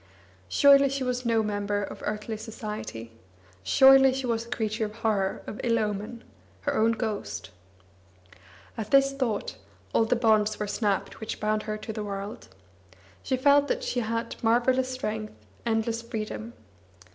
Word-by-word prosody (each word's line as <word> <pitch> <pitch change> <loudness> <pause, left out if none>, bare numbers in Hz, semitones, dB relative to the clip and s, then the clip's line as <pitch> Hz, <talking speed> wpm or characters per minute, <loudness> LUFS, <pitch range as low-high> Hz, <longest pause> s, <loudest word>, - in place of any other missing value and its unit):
Surely 275 - +6
she 275 0 -2
was 250 -1 -2
no 225 -1 +3
member 205 -1 -1
of - - -7
earthly 215 +1 -3
society! 210 - -7 0.5
Surely 265 - +7
she 265 0 -3
was 230 -1 -1
a - - -14
creature 220 -1 -2
of 210 0 -7
horror, 215 -4 -1
of 215 - -6
ill 230 -1 +2
omen, 210 +2 -3 0.4
her - - -1
own 225 +1 +3
ghost! 210 - -4 1.2
At 220 -2 -5
this 275 0 +4
thought, 255 -7 -2 0.4
all 225 - +4
the 225 - +2
bonds 215 -2 +3
were 210 - -1
snapped 205 -1 -1
which 220 - -5
bound 215 0 0
her 215 - -2
to 220 +1 -6
the 215 - -4
world. 200 +1 -6 0.7
She 260 - -1
felt 285 +2 +4
that - - -1
she 370 - -1
had 230 0 -2
marvellous 250 +3 +2
strength, 220 -5 -4 0.3
endless 225 0 0
freedom. 215 - -5
225 Hz, 155 wpm, -27 LUFS, 210-250 Hz, 1.2 s, Surely